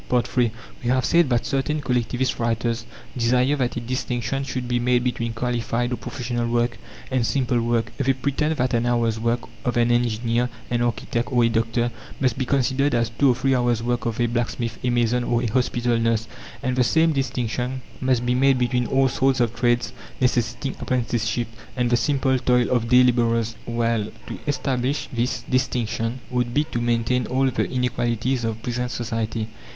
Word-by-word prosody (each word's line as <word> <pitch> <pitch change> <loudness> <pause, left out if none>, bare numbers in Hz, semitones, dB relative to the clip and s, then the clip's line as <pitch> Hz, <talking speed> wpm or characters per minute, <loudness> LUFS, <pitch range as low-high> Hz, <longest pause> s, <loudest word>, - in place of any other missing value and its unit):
III 125 -1 +2 0.3
We 120 - 0
have 130 0 +2
said 170 -4 +4
that 120 -2 +1
certain 145 +3 0
collectivist 125 -1 -1
writers 115 0 -1 0.3
desire 125 +3 +2
that 125 -3 -1
a - - -1
distinction 125 +2 -2
should 130 -2 -4
be 120 0 +1
made 125 0 +2
between 115 -2 -1
qualified 120 0 -1
or - - +1
professional 120 -2 -3
work 120 0 0 0.3
and 130 -2 +2
simple 125 -1 +1
work. 115 -1 0
They 135 -1 +3
pretend 140 +4 -1
that 125 0 0
an 120 +1 +1
hour's 115 -2 +1
work 115 +1 0 0.2
of 125 -1 -1
an 120 0 +3
engineer, 120 0 +1 0.2
an 120 -1 +1
architect, 120 +1 -1
or 120 -2 +3
a 115 - +4
doctor, 115 +1 0 0.3
must 130 -4 +1
be 130 -2 -2
considered 135 0 +2
as 115 -1 +1
two 140 +4 +3
or 125 - +4
three 135 +2 +1
hours' 120 -2 +1
work 120 -1 -1
of 115 0 -3
a 120 - +3
blacksmith, 120 0 -2
a 125 - +1
mason, 120 0 +2
or 120 0 0
a 115 - -1
hospital 120 -1 +1
nurse. 115 -1 +1 0.4
And 130 0 0
the 130 - +4
same 160 +7 +3
distinction 125 -1 -2 0.2
must 130 -2 +1
be 120 - +2
made 135 +1 +4
between 125 -1 +1
all 135 0 +3
sorts 130 +1 +1
of 120 -2 +1
trades 120 0 +1 0.3
necessitating 125 +2 0
apprenticeship, 120 -1 -1 0.3
and 125 -1 +1
the - - +5
simple 130 +1 +1
toil 125 -1 +2
of 120 -2 +1
day 125 +1 +7
labourers. 115 -2 +2
Well, 115 -2 0 0.2
to - - -7
establish 135 -1 -1
this 120 +1 -1
distinction 125 -1 -1
would 125 -1 -1
be 150 - +4
to 120 - -1
maintain 120 +1 +1
all 130 +1 +1
the - - -1
inequalities 125 0 0
of 110 0 -3
present 125 0 -2
society. 115 -2 -2
120 Hz, 185 wpm, -23 LUFS, 115-130 Hz, 0.4 s, day